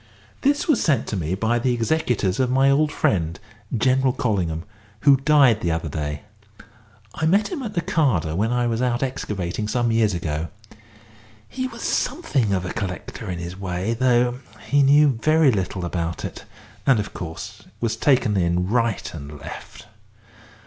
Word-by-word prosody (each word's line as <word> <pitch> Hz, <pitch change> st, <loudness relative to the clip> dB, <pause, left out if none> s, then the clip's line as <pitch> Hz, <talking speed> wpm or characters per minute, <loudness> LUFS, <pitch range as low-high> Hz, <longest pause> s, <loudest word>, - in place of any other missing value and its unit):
This 285 Hz, +1 st, +1 dB
was 300 Hz, -8 st, +3 dB
sent 140 Hz, -8 st, +2 dB
to -, -, -2 dB
me 90 Hz, -1 st, -2 dB
by 115 Hz, +4 st, +1 dB
the 125 Hz, +1 st, +1 dB
executors 115 Hz, -6 st, 0 dB
of 130 Hz, -1 st, +2 dB
my 135 Hz, +2 st, +4 dB
old 150 Hz, +2 st, +2 dB
friend, 85 Hz, -, 0 dB, 0.4 s
General 130 Hz, +2 st, +2 dB
Collingham, 90 Hz, -, -1 dB, 0.4 s
who 140 Hz, -1 st, +6 dB
died 135 Hz, -6 st, +4 dB
the 85 Hz, -, 0 dB
other 80 Hz, -1 st, -2 dB
day. 75 Hz, -1 st, -4 dB, 0.9 s
I 160 Hz, -, -1 dB
met 200 Hz, +6 st, +3 dB
him 345 Hz, -7 st, -4 dB
at 215 Hz, -5 st, -6 dB
Nakada 145 Hz, -, +1 dB
when 110 Hz, +6 st, 0 dB
I 125 Hz, 0 st, +1 dB
was 115 Hz, 0 st, -1 dB
out 125 Hz, 0 st, 0 dB
excavating 105 Hz, -6 st, -3 dB
some 120 Hz, +1 st, 0 dB
years 110 Hz, -4 st, +2 dB
ago. 80 Hz, -1 st, -3 dB, 1.0 s
He 260 Hz, 0 st, -3 dB
was -, -, -9 dB
something 135 Hz, -, 0 dB
of 95 Hz, -2 st, 0 dB
a 90 Hz, -, -4 dB
collector 95 Hz, -2 st, -5 dB
in 90 Hz, -, -3 dB
his 85 Hz, +1 st, -6 dB
way, 95 Hz, +3 st, -2 dB
though 125 Hz, 0 st, +2 dB, 0.3 s
he 145 Hz, 0 st, +3 dB
knew 140 Hz, -2 st, +5 dB
very 155 Hz, -1 st, +4 dB
little 95 Hz, -3 st, -2 dB
about 85 Hz, -1 st, -3 dB
it, -, -, -8 dB, 0.4 s
and, 130 Hz, -5 st, +5 dB
of 105 Hz, -, -4 dB
course, 80 Hz, -2 st, -7 dB, 0.2 s
was 115 Hz, -1 st, -1 dB
taken 125 Hz, -7 st, +2 dB
in 90 Hz, 0 st, +1 dB
right 115 Hz, -2 st, 0 dB
and 75 Hz, -2 st, -8 dB
left. -, -, -10 dB
115 Hz, 165 wpm, -23 LUFS, 90-135 Hz, 1.0 s, who